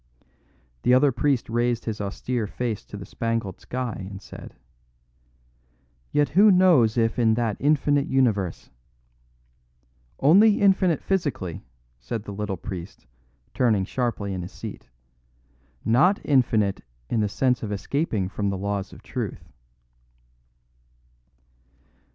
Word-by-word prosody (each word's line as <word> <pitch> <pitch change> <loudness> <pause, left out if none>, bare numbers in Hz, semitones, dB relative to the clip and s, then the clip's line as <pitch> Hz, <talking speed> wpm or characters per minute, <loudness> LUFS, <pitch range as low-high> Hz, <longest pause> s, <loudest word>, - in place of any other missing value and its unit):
The 125 - +4
other 140 +2 +4
priest 135 0 0
raised 120 +1 0
his 110 -2 -3
austere 110 +3 -3
face 115 0 -3
to 105 - -9
the 100 - -8
spangled 115 -5 -3
sky 120 -7 -4
and 95 -1 -8
said: - - -11 1.6
"Yet 145 0 +2
who 200 +7 +6
knows 175 - +5
if 115 +1 +1
in 110 -2 +3
that 115 -3 0
infinite 145 0 +2
universe 110 -10 0 0.7
?" - - -40
"Only 205 +5 +6
infinite 190 -5 +3
physically," 145 - -2 0.4
said 100 - -5
the 100 - -7
little 100 -1 -3
priest, 90 - -8 0.5
turning 110 -6 +2
sharply 110 -4 -2
in 90 - -4
his 90 - -7
seat, 60 - -9 1.0
"not 175 - +4
infinite 110 -8 +2 0.3
in 115 - -1
the 105 -1 +1
sense 125 +4 +1
of 105 - -4
escaping 105 - -1
from 100 +1 -2
the 100 - -2
laws 100 0 -3
of - - -14
truth." - - -5
115 Hz, 125 wpm, -24 LUFS, 100-135 Hz, 1.6 s, who